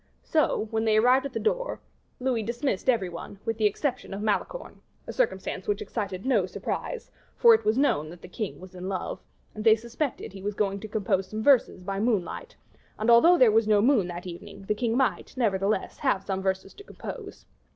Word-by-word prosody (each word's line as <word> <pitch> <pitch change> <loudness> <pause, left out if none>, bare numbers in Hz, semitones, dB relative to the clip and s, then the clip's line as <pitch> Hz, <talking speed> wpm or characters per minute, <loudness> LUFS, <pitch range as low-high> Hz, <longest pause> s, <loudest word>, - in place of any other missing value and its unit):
So, 310 -8 +1
when 220 0 0
they 215 -1 +3
arrived 255 +4 +4
at 270 - -15
the - - -2
door, - - -1 0.4
Louis 250 -3 0
dismissed 235 +1 -2
every 225 -7 +3
one, 175 +3 -8
with 225 -1 -2
the 215 - +5
exception 250 -1 -3
of 200 - -5
Malicorne - - -2 0.2
a - - -6
circumstance - - -1
which 415 - 0
excited 205 - -4
no 220 -9 +2
surprise, 465 - -5 0.3
for 470 -1 +8
it 445 - +2
was 215 +3 +2
known 155 - +2
that 175 +1 -12
the - - -8
king 210 +2 -5
was 185 0 -12
in 185 +1 -6
love; 190 -2 -3 0.3
and 215 - -6
they 220 -1 +7
suspected 235 0 -4
he 195 - -9
was 205 +1 -3
going 200 -1 0
to 215 - -7
compose 195 -3 0
some 215 +3 -4
verses 250 -9 +4
by 195 +1 -3
moonlight; 230 - -1 0.4
and, 220 +2 +2
although 330 +10 +7
there 250 -7 +6
was 220 0 +3
no 210 -1 +5
moon 225 -4 +3
that 175 0 -7
evening, 190 +3 -9
the 205 - 0
king 230 +2 -1
might, 265 -1 -1
nevertheless, 200 -3 0
have 235 -9 +1
some 190 -1 -2
verses 190 0 -2
to 410 - -13
compose. - - -9
215 Hz, 205 wpm, -27 LUFS, 195-255 Hz, 0.4 s, for